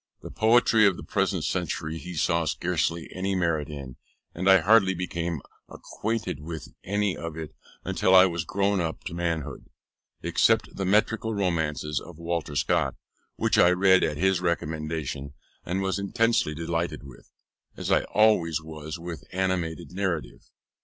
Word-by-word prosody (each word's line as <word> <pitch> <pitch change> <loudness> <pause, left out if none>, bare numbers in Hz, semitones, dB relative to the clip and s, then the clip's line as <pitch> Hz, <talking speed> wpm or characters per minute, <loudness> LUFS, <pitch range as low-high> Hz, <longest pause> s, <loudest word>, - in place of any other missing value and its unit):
The - - -8
poetry 110 -1 +4
of 95 -3 +1
the - - -8
present - - 0
century 80 +1 -2
he 90 +1 -8
saw 85 +1 +1
scarcely 85 0 -1
any 95 +1 -1
merit 85 -5 0
in, 70 -4 -8 0.4
and 90 +3 0
I 95 - +9
hardly 95 0 +5
became 85 -3 -3 0.3
acquainted 110 -8 -4
with 80 -2 -7
any 100 0 0
of 85 -1 -6
it 80 -3 -6 0.4
till 95 - +4
I 95 0 +9
was 85 -3 -1
grown 100 -1 0
up 80 -1 -4
to - - -6
manhood, 85 -3 -3 0.5
except - - +2
the 95 - -2
metrical 110 +3 +1
romances 80 -6 -1
of 85 -2 -12
Walter 85 -3 -3
Scott, - - +1 0.4
which - - +1
I 85 - +7
read 95 +1 +4
at 75 - 0
his 95 +1 +2
recommendation 75 -4 -3 0.3
and 95 +2 -2
was 95 0 -1
intensely 100 -4 +1
delighted 85 -1 -2
with; 65 -3 -14 0.5
as - - -3
I - - +5
always 90 -8 +3
was 80 0 -7
with 85 -1 -7
animated 90 -4 -2
narrative. 85 -11 -3
85 Hz, 155 wpm, -26 LUFS, 80-95 Hz, 0.5 s, I